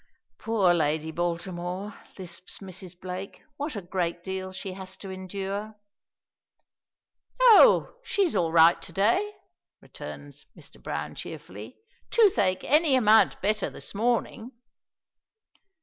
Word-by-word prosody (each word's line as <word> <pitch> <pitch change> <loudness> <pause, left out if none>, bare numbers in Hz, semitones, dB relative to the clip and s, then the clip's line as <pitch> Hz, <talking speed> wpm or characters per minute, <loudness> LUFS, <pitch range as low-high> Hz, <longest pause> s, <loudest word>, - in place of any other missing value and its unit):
"Poor 210 -5 +2
Lady 160 -1 0
Baltimore!" 175 +3 -3 0.2
lisps 180 -1 -6
Mrs. 185 -2 -9
Blake. 185 +2 -7
"What 290 -1 -4
a 200 - -5
great 175 -1 -3
deal 190 0 -5
she 190 0 -6
has 190 0 -8
to 195 - -8
endure." 195 +3 -5 1.6
"Oh, - - +7
she's 390 -8 0
all 165 -2 +1
right 165 +1 +6
to - - -11
day," 235 - +1 0.4
returns 145 0 -10
Mr. - - -13
Browne, - - -4
cheerfully. - - -9 0.3
"Toothache 360 - +3
any 300 -1 +4
amount 220 -3 +4
better 210 +1 0
this - - -8
morning." 235 +2 -1
190 Hz, 115 wpm, -27 LUFS, 175-220 Hz, 1.6 s, Oh